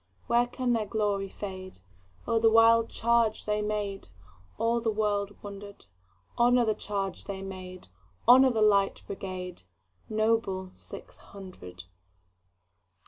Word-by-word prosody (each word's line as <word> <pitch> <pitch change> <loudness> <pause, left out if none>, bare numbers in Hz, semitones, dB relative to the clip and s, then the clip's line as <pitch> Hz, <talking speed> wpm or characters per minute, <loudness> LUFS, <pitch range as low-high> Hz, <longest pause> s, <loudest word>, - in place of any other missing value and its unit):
When 240 +1 +2
can 245 0 -1
their 220 -2 -1
glory 200 -2 -1
fade?O 95 - -6
the 225 0 +5
wild 225 0 +5
charge 230 -1 +1
they 210 0 0
made! 210 -2 -3 0.5
All 230 +1 +1
the 225 - 0
world 205 -2 -1
wonder'd. 200 0 -9 0.5
Honor 245 0 +4
the 220 - +2
charge 200 -2 -4
they 195 -1 -6
made! 185 - -9 0.4
Honor 260 +2 +8
the 225 -3 +1
Light 200 -2 +2
Brigade, 185 -2 -6 0.5
Noble 215 -4 0
six - - -11
hundred! 180 - -11
205 Hz, 120 wpm, -28 LUFS, 190-225 Hz, 0.5 s, Honor